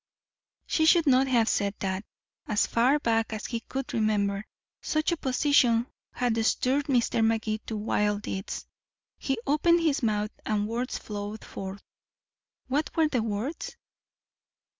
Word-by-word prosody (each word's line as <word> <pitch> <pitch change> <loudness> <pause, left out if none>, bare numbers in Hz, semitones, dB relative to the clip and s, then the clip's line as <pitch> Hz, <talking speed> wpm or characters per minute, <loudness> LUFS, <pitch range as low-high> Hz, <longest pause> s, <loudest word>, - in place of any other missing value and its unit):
She 315 -1 +2
should 335 0 +5
not 265 -1 +4
have 235 -4 +3
said 200 -2 0
that. 190 0 -2 0.4
As 210 - +2
far 250 +5 +3
back 225 -5 0
as 215 - -5
he 235 - -2
could 270 +4 -5
remember, 210 -3 0 0.3
such 310 +2 0
opposition 260 -5 +3 0.3
had 230 -2 0
stirred 265 +5 +1
Mr. 240 -4 +2
Magee 220 -1 +1
to 220 - -3
wild 210 -1 0
deeds. 190 0 -4 0.5
He 270 -2 -1
opened 335 +4 +3
his 315 -2 +1
mouth 210 -2 0
and 210 -1 0
words 240 +3 -2
flowed 205 0 -6
forth. 195 +1 -7 0.8
What 285 +4 0
were 320 -2 +3
the 250 -5 0
words? 225 +8 -4
230 Hz, 140 wpm, -27 LUFS, 210-275 Hz, 0.8 s, should